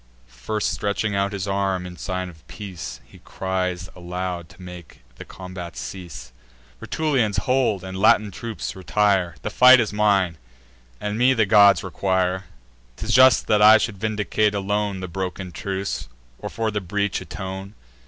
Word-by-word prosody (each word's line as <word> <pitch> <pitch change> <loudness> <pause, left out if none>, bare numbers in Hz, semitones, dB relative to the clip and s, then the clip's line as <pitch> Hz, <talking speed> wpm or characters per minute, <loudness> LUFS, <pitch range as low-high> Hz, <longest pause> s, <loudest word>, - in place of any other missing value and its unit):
First - - -3
stretching 105 0 -1
out 100 0 0
his 100 -1 -4
arm, 95 -2 -1
in 90 -1 -8
sign 95 0 -4
of 80 -3 -15
peace, 95 -6 -8
He - - -17
cries 95 -1 -3
aloud, 90 -1 -5
to 90 - -18
make 90 -7 -11 0.2
the - - -9
combat 90 -4 -9
cease: 85 -9 -8 0.5
"Rutulians, 135 - 0
hold; 125 -7 +1
and 95 0 -7
Latin 105 +1 +4
troops, 115 +3 -6
retire! 95 -1 +1
The - - -3
fight 130 0 +8
is 110 -3 -1
mine; 100 -6 +2 0.6
and 105 +1 -3
me 130 +2 +4
the 110 -2 +3
gods 100 0 +6
require. 95 0 -1 0.5
'Tis 110 - -3
just 130 -3 +6
that 105 -1 +2
I 110 +1 +9
should 110 -3 -3
vindicate 105 -1 0
alone 100 -1 -1
The 95 - -4
broken 95 +1 -5
truce, 95 +2 -4 0.3
or - - -5
for 110 -1 -2
the 105 0 -2
breach 100 +2 -1
atone. 95 +2 -7
95 Hz, 155 wpm, -23 LUFS, 90-105 Hz, 0.6 s, I